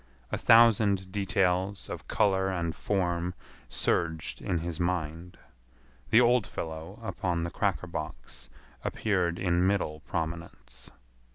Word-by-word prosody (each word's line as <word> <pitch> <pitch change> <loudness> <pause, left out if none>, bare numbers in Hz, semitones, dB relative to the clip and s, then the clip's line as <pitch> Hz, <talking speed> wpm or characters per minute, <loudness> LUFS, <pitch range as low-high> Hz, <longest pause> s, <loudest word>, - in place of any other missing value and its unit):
A - - 0
thousand 105 -5 +5
details 95 0 0
of - - -7
color 95 -2 +2
and 85 -3 -2
form 90 -2 -1 0.3
surged 80 -2 -1
in 90 - -1
his 85 -1 -4
mind. 85 -1 -2 0.7
The 115 - +6
old 120 -2 +4
fellow 80 +5 -6
upon 90 -6 -2
the 85 - -3
cracker 100 -3 0
box 80 -3 -7 0.3
appeared 90 -5 0
in 90 -1 +2
middle 90 -6 0
prominence. 80 -7 -6
90 Hz, 115 wpm, -29 LUFS, 85-100 Hz, 0.7 s, The